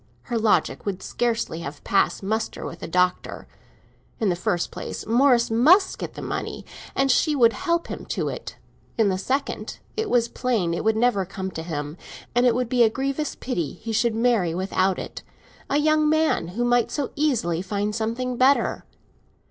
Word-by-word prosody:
Her 235 -2 -2
logic 220 -1 +2
would 190 -2 -3
scarcely 230 -8 -1
have 145 -2 -7
passed 200 - +1
muster 220 +3 -2
with - - -7
the - - -6
Doctor. 180 +2 0 0.7
In 215 - +1
the 175 - +1
first 175 0 -1
place, - - -6
Morris 240 0 +3
must 320 - +4
get - - -6
the - - -7
money, - - -4 0.3
and 270 0 +3
she 300 +4 +3
would 235 -4 +5
help 340 -2 0
him - - -7
to - - -2
it. - - -6 0.4
In 220 -3 +3
the 185 -1 -1
second, 270 +7 -2 0.2
it 440 0 -2
was 235 -1 +3
plain 230 -10 -1
it 170 - -2
would 220 0 +2
never 230 -4 +2
come 190 0 -5
to 160 - -5
him, 150 -1 -5 0.4
and 245 +1 +4
it 235 - +3
would 250 -1 0
be 245 +1 +1
a 230 - +6
grievous 275 +5 -2
pity 175 - -3
he 225 +1 -7
should 225 +1 +2
marry 225 -8 +2
without 185 0 +1
it—a 280 - -6
young 305 0 +3
man 315 - +2
who 240 - +1
might 240 -1 +3
so 285 -3 -3
easily 230 - +1
find 205 +2 -2
something 230 +3 -2
better. 265 +3 +3
230 Hz, 180 wpm, -24 LUFS, 190-260 Hz, 0.7 s, a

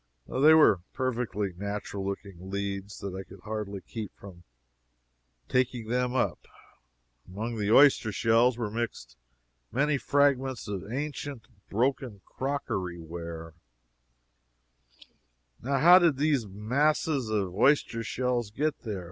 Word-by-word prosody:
They 150 +4 +5
were 150 -10 +6
such 90 - -31
perfectly 115 -6 -2
natural 100 +1 -4
looking 95 -2 -6
leads 100 0 -4
that 100 -2 -5
I 95 - -5
could 95 -1 -14
hardly 105 -1 -5
keep 105 +4 -7
from 90 -3 -13 1.0
"taking 125 -3 0
them 125 +1 0
up." 130 - 0 0.9
Among 110 +5 -5
the 105 0 0
oyster 135 -4 +6
shells 115 +3 +3
were 115 -4 -3
mixed 110 - -4 0.6
many 145 +2 +1
fragments 135 -3 +1
of 100 0 -5
ancient, 145 -2 -5 0.2
broken 120 -2 -1
crockery 130 -10 -3
ware. 85 -1 -7 2.1
Now 135 +3 0
how 175 +6 +8
did 165 -6 +3
those 140 -6 +1
masses 130 +5 0
of 100 -4 -1
oyster 115 +1 +2
shells 125 -1 -1
get 145 +7 -1
there? 105 -4 -5
115 Hz, 120 wpm, -28 LUFS, 100-135 Hz, 2.1 s, how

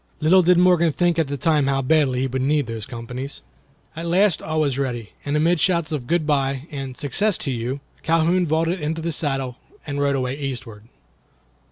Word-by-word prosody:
Little 175 +4 +5
did 180 0 +4
Morgan 175 -2 +4
think 175 +3 +1
at 160 - +1
the 140 +1 -3
time 150 0 +2
how 135 -1 +1
badly 130 -3 +2
he - - +1
would 130 0 -2
need 145 +1 +1
those 115 -2 -6
companies. 125 +3 -7 0.5
At 165 +1 -5
last 185 +1 +3
all 155 0 -1
was 140 -3 0
ready, 120 -5 -3
and 145 +1 0
amid 165 +2 +2
shouts 170 -1 +1
of 140 -6 -3
"Good 170 -2 +1
bye" 135 -2 0
and 135 -3 -6
"Success 185 - +1
to 140 - -3
you," 125 +3 -3 0.2
Calhoun 165 +2 +2
vaulted 165 +3 0
into 160 +2 -2
the 170 - -1
saddle 135 -5 -2 0.3
and 145 -1 -3
rode 140 -1 +2
away 130 0 -1
eastward. 120 -6 -6
145 Hz, 195 wpm, -22 LUFS, 130-165 Hz, 0.5 s, Little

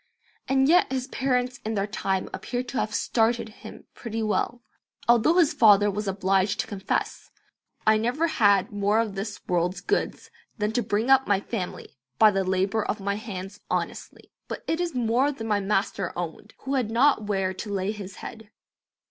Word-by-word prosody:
And 270 0 +3
yet 345 -3 +4
his 260 -1 -1
parents 250 -2 -1
in 220 +1 -2
their 200 -1 0
time 195 -2 -2
appear 245 0 -3
to 255 +1 -4
have 215 - -1
"started" 230 +1 +1
him 215 - -12
pretty 225 -1 -4
well, 235 +3 -1 0.4
although 240 +7 +5
his 340 -5 +4
father 205 -2 +5
was 210 +1 -4
obliged 190 0 +1
to - - -7
confess, 195 -2 -3 0.6
"I 215 0 +5
never 245 +9 0
had 205 - +3
more 205 +1 +1
of 225 -3 -1
this 200 +1 -5
world's 180 +1 0
goods 415 +1 -2 0.3
than 210 -1 0
to 240 +2 0
bring 220 +3 0
up 265 0 +5
my 200 -1 +3
family 190 - -6 0.2
by 215 -1 +7
the 195 -1 0
labour 190 +3 0
of 210 - -2
my 200 0 -1
hands 200 -1 -7
honestly, - - -4 0.2
but - - -6
it 325 +2 -1
is 340 -5 -2
more 245 +4 +2
than 225 -5 -6
my 210 -2 +2
Master 195 -2 -1
owned, 175 +5 -6
who 270 - -3
had 255 -5 0
not 235 -1 +3
where 195 -2 0
to 205 +3 -7
lay 195 0 -1
His 200 -3 -8
head." 220 -2 -9
215 Hz, 180 wpm, -26 LUFS, 195-245 Hz, 0.6 s, by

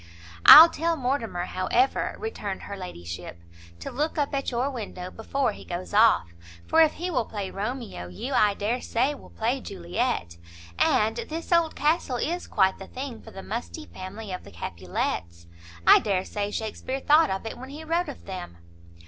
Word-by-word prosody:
"I'll 320 +2 +13
tell 330 +1 0
Mortimer, 245 -9 -2
however," 235 +8 0
returned 210 - -5
her 200 - -6
ladyship, 85 - -8 0.4
"to - - -5
look 300 +4 -2
up 290 -1 0
at 275 -1 -1
your 250 +3 -1
window 190 -7 -6
before 250 +2 -1
he - - -11
goes 175 +3 -6
off; 210 - +4 0.3
for 325 - +4
if 315 -1 +5
he 360 +2 -4
will 250 -8 0
play 200 -3 -5
Romeo, 215 - -5
you, 90 - -6
I 210 -5 +4
dare 230 +5 -1
say, 255 +5 0
will 285 - -13
play 240 +4 -1
Juliet, 180 - -3 0.4
and 220 +1 +3
this 325 +3 -6
old 335 -2 +3
castle 295 -4 +1
is 345 +8 -2
quite 190 -1 +2
the 195 - -9
thing 255 -3 -7
for - - -12
the 195 - -9
musty 240 +8 -5
family 195 0 -8
of 180 - -5
the - - -12
Capulets; 85 -1 -4 0.4
I - - +9
dare 190 -3 -1
say 205 -1 -3
Shakespeare 220 +5 -4
thought 305 +4 +4
of 190 +3 -3
it 225 - -6
when 260 +1 -9
he 300 +3 -8
wrote 335 +1 0
of 285 - -10
them." 180 - -7
225 Hz, 180 wpm, -26 LUFS, 190-280 Hz, 0.4 s, I'll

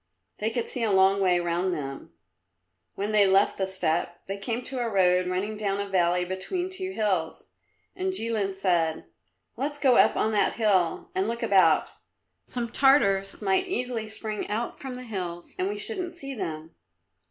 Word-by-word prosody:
They 215 - +1
could 230 +1 -2
see 250 - -4
a 225 - +2
long 195 +1 +4
way 180 -2 +3
round 175 +1 0
them. 135 - -6 0.8
When 205 +2 -2
they 210 -2 +5
left 195 +2 +3
the 190 - +1
steppe 175 -2 -1
they 195 +1 -5
came 230 +4 -2
to 260 0 -5
a 240 -1 -1
road 180 -3 +3
running 190 +4 -2
down 200 -2 -1
a 200 - -2
valley 180 -2 +2
between 350 - -3
two 375 0 -4
hills. 190 - -2 0.4
And 375 0 -1
Jilin 220 - -1
said, 175 - 0 0.5
"Let's 290 +3 -2
go 265 -4 +4
up - - +5
on 220 - +1
that 210 - +2
hill 215 - +1
and 380 +1 0
look 235 0 -3
about; 195 -4 +4 0.6
some 235 -2 -4
Tartars 205 -9 +3
might 195 - +2
easily 245 - -2
spring 215 -1 -5
out 225 +3 -3
from 265 -2 -6
the 250 - -7
hills 180 -7 -6
and 370 +1 0
we 415 - -3
shouldn't 380 -5 -3
see 275 -5 -6
them." 165 -7 -5
205 Hz, 175 wpm, -27 LUFS, 185-250 Hz, 0.8 s, they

